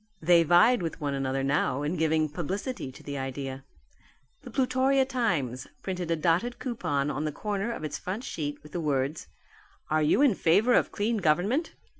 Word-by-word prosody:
They 170 Hz, +1 st, +5 dB
vied 175 Hz, +8 st, +5 dB
with 165 Hz, 0 st, -4 dB
one 145 Hz, -3 st, -2 dB
another 135 Hz, 0 st, -1 dB
now 140 Hz, 0 st, +1 dB
in 150 Hz, +5 st, -1 dB
giving 160 Hz, -1 st, +2 dB
publicity 180 Hz, -, -4 dB
to -, -, -14 dB
the 140 Hz, -1 st, -5 dB
idea. 135 Hz, 0 st, -5 dB, 0.8 s
The 265 Hz, -, -10 dB
Plutorian 260 Hz, +2 st, +2 dB
Times 170 Hz, -, -1 dB, 0.2 s
printed 180 Hz, -3 st, -3 dB
a 165 Hz, -, +2 dB
dotted 175 Hz, +10 st, +1 dB
coupon 150 Hz, -, -2 dB
on 145 Hz, +1 st, -3 dB
the 155 Hz, -, -1 dB
corner 205 Hz, +6 st, -3 dB
of 230 Hz, -, -6 dB
its 155 Hz, -, -4 dB
front 200 Hz, +7 st, -4 dB
sheet 145 Hz, -, -5 dB
with 150 Hz, -, -13 dB
the 175 Hz, -, -3 dB
words, 140 Hz, 0 st, -1 dB, 0.6 s
"Are 155 Hz, 0 st, +3 dB
you 155 Hz, -, +3 dB
in 275 Hz, -6 st, +5 dB
favour 200 Hz, +8 st, +3 dB
of -, -, +3 dB
Clean 220 Hz, +2 st, 0 dB
Government? 200 Hz, -, +1 dB
165 Hz, 180 wpm, -28 LUFS, 145-225 Hz, 0.8 s, They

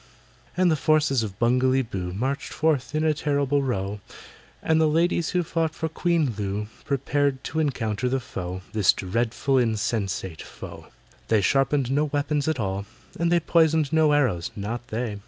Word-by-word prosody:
So 185 Hz, +2 st, +2 dB
the 165 Hz, -3 st, +4 dB
forces 150 Hz, -3 st, +2 dB
of 100 Hz, -4 st, -5 dB
BUNGALEE 130 Hz, +2 st, +3 dB
BOO 90 Hz, -2 st, -3 dB
Marched 130 Hz, +9 st, -3 dB
forth 155 Hz, -3 st, 0 dB
in 155 Hz, -, +1 dB
a 155 Hz, -1 st, +3 dB
terrible 145 Hz, -1 st, 0 dB
row, 105 Hz, -6 st, -2 dB, 0.6 s
And 160 Hz, 0 st, +3 dB
the 160 Hz, -, +4 dB
ladies 165 Hz, +2 st, +1 dB
who 180 Hz, -1 st, +1 dB
fought 165 Hz, 0 st, -1 dB
for 160 Hz, -, -2 dB
QUEEN 165 Hz, -5 st, +1 dB
LOO 105 Hz, +1 st, -3 dB, 0.2 s
Prepared 140 Hz, 0 st, 0 dB
to 160 Hz, -, -3 dB
encounter 125 Hz, -5 st, -1 dB
the 135 Hz, +1 st, 0 dB
foe— 95 Hz, -6 st, -6 dB
This 105 Hz, -4 st, +4 dB
dreadful, 120 Hz, +7 st, 0 dB
insatiate 105 Hz, -7 st, -1 dB
foe! -, -, -10 dB, 0.2 s
But -, -, -30 dB
they 110 Hz, -2 st, +3 dB
sharpened 135 Hz, +4 st, +2 dB
no 145 Hz, +2 st, +2 dB
weapons 145 Hz, 0 st, -1 dB
at 160 Hz, -4 st, 0 dB
all, 100 Hz, -1 st, -2 dB, 0.3 s
And 170 Hz, 0 st, +1 dB
they 175 Hz, -, +5 dB
poisoned 160 Hz, -2 st, +2 dB
no 160 Hz, -1 st, +4 dB
arrows—not 115 Hz, -, -1 dB
they! 110 Hz, -3 st, -3 dB
135 Hz, 165 wpm, -25 LUFS, 110-155 Hz, 0.6 s, they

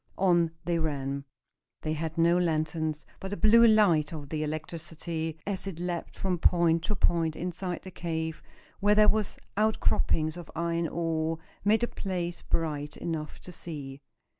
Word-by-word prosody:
On 175 Hz, -3 st, +4 dB, 0.2 s
they 170 Hz, -1 st, +1 dB
ran. 140 Hz, -3 st, -2 dB, 0.6 s
They 155 Hz, -, 0 dB
had 160 Hz, +1 st, -3 dB
no 170 Hz, +1 st, +5 dB
lanterns, 160 Hz, -2 st, 0 dB
but 190 Hz, -, -5 dB
the 205 Hz, -, -3 dB
blue 230 Hz, +2 st, +7 dB
light 185 Hz, -9 st, +4 dB
of 150 Hz, -4 st, -7 dB
the 155 Hz, 0 st, -2 dB
electricity, 160 Hz, +1 st, -4 dB
as 195 Hz, -1 st, -2 dB
it 185 Hz, -5 st, -5 dB
leaped 175 Hz, -1 st, -4 dB
from 185 Hz, -2 st, -1 dB
point 170 Hz, -1 st, +4 dB
to 210 Hz, -, 0 dB
point 165 Hz, -3 st, +2 dB
inside 180 Hz, 0 st, -4 dB
the 185 Hz, -, -8 dB
cave, 160 Hz, -2 st, -3 dB, 0.4 s
where 205 Hz, +1 st, +4 dB
there 210 Hz, 0 st, +6 dB
were 215 Hz, 0 st, +4 dB, 0.3 s
outcroppings 175 Hz, -6 st, +2 dB
of 175 Hz, -3 st, -9 dB
iron 170 Hz, 0 st, 0 dB
ore, 165 Hz, -1 st, -1 dB, 0.3 s
made 215 Hz, +3 st, +4 dB
the 240 Hz, -, +2 dB
place 175 Hz, -5 st, -3 dB
bright 150 Hz, -2 st, -2 dB
enough 160 Hz, -3 st, -4 dB
to 180 Hz, -, -9 dB
see. 145 Hz, -5 st, -7 dB
165 Hz, 160 wpm, -29 LUFS, 155-180 Hz, 0.6 s, blue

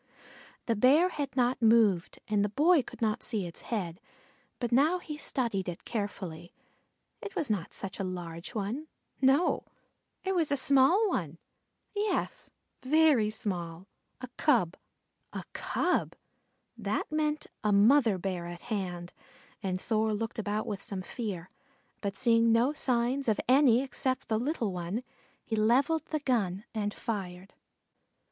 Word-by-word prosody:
The 230 Hz, -, +1 dB
Bear 280 Hz, -, +5 dB
had 285 Hz, -6 st, -4 dB
not 250 Hz, 0 st, +2 dB
moved 220 Hz, -6 st, +4 dB
and 210 Hz, -1 st, +2 dB
the 205 Hz, -, 0 dB
boy 305 Hz, -, +4 dB
could 235 Hz, -, -8 dB
not 215 Hz, -1 st, +1 dB
see 220 Hz, -6 st, -1 dB
its 170 Hz, -, -8 dB
head, 185 Hz, -4 st, -4 dB, 0.6 s
but 240 Hz, -2 st, -3 dB
now 295 Hz, +9 st, +4 dB
he 310 Hz, -4 st, -7 dB
studied 230 Hz, -10 st, -2 dB
it 170 Hz, -, -8 dB
carefully. 185 Hz, -6 st, -5 dB, 0.7 s
It 420 Hz, -4 st, -7 dB
was 280 Hz, -8 st, 0 dB
not 190 Hz, -6 st, -2 dB
such 195 Hz, +1 st, -5 dB
a -, -, -1 dB
large 175 Hz, +1 st, -6 dB
one 225 Hz, +9 st, -3 dB, 0.3 s
no, 275 Hz, +6 st, +3 dB, 0.6 s
it 385 Hz, -, 0 dB
was 330 Hz, -6 st, +1 dB
a 285 Hz, -, +2 dB
small 275 Hz, +11 st, +4 dB
one, 170 Hz, -, -2 dB, 0.6 s
yes, 415 Hz, 0 st, -1 dB, 0.3 s
very 285 Hz, -5 st, +4 dB
small 180 Hz, -5 st, -4 dB, 0.3 s
a 255 Hz, -, -6 dB
cub. 225 Hz, -, +3 dB, 0.6 s
A -, -, -4 dB
cub! -, -, 0 dB, 0.6 s
That -, -, -2 dB
meant 305 Hz, -1 st, 0 dB, 0.2 s
a 210 Hz, -, +2 dB
mother 220 Hz, +1 st, +5 dB
Bear 180 Hz, -2 st, -3 dB
at 175 Hz, 0 st, -8 dB
hand, 180 Hz, -3 st, -4 dB, 0.5 s
and 185 Hz, -2 st, -2 dB
Thor 220 Hz, +1 st, 0 dB
looked 225 Hz, +2 st, -4 dB
about 210 Hz, 0 st, -1 dB
with 200 Hz, -2 st, -4 dB
some 200 Hz, -4 st, -3 dB
fear, 190 Hz, -6 st, -5 dB, 0.5 s
but 200 Hz, -1 st, -3 dB
seeing 230 Hz, -1 st, +4 dB
no 240 Hz, +5 st, +3 dB
signs 255 Hz, -1 st, 0 dB
of 215 Hz, -, +1 dB
any 255 Hz, -1 st, +5 dB
except 260 Hz, -1 st, -2 dB
the 220 Hz, -1 st, +1 dB
little 240 Hz, -, -1 dB
one, 180 Hz, +7 st, -3 dB, 0.4 s
he 225 Hz, -, -2 dB
levelled 260 Hz, +9 st, +2 dB
the 310 Hz, -2 st, -2 dB
gun 210 Hz, -8 st, 0 dB
and 210 Hz, -2 st, -1 dB
fired. 190 Hz, -4 st, -5 dB
225 Hz, 145 wpm, -30 LUFS, 195-270 Hz, 0.7 s, Bear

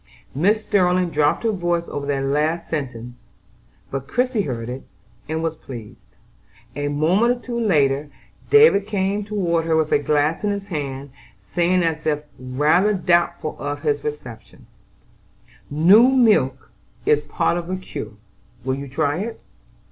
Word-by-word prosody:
Mrs. 185 Hz, +9 st, +3 dB
Sterling 180 Hz, -4 st, +1 dB
dropped 150 Hz, +5 st, +1 dB
her 225 Hz, -, +2 dB
voice 175 Hz, -3 st, -1 dB
over 140 Hz, -1 st, -5 dB
that 140 Hz, -1 st, -1 dB
last 150 Hz, +5 st, 0 dB
sentence; 125 Hz, -5 st, -5 dB, 0.7 s
but 135 Hz, 0 st, -4 dB
Christie 250 Hz, -, 0 dB
heard 120 Hz, -8 st, -4 dB
it, 125 Hz, +2 st, -5 dB, 0.5 s
and 160 Hz, +1 st, -2 dB
was 165 Hz, -1 st, -1 dB
pleased. 120 Hz, -8 st, -11 dB, 0.6 s
A 145 Hz, +1 st, -2 dB
moment 180 Hz, +12 st, +2 dB
or -, -, -14 dB
two 240 Hz, -1 st, -3 dB
later, 145 Hz, -9 st, +2 dB, 0.4 s
David 435 Hz, -, +6 dB
came 200 Hz, 0 st, -1 dB
toward 180 Hz, -6 st, -1 dB
her 165 Hz, -1 st, +1 dB
with 160 Hz, -1 st, +1 dB
a -, -, +4 dB
glass 150 Hz, +4 st, 0 dB
in 210 Hz, -, +1 dB
his 200 Hz, -1 st, -3 dB
hand, 140 Hz, -4 st, -5 dB, 0.3 s
saying 180 Hz, +1 st, 0 dB
as 160 Hz, -1 st, -2 dB
if 150 Hz, -1 st, 0 dB, 0.2 s
rather 150 Hz, +11 st, +2 dB
doubtful 175 Hz, -4 st, +1 dB
of 145 Hz, 0 st, -4 dB
his 145 Hz, -1 st, 0 dB
reception: 125 Hz, -7 st, -8 dB, 1.0 s
"New 185 Hz, -, +6 dB
milk 210 Hz, -, +2 dB, 0.3 s
is 150 Hz, 0 st, +3 dB
part 150 Hz, +3 st, 0 dB
of 170 Hz, -, -7 dB
the 185 Hz, -, -2 dB
cure: 185 Hz, -, -7 dB, 0.5 s
will 130 Hz, -, 0 dB
you 140 Hz, +1 st, -5 dB
try 145 Hz, +4 st, -1 dB
it?" 225 Hz, +3 st, -5 dB
160 Hz, 150 wpm, -21 LUFS, 145-190 Hz, 1.0 s, David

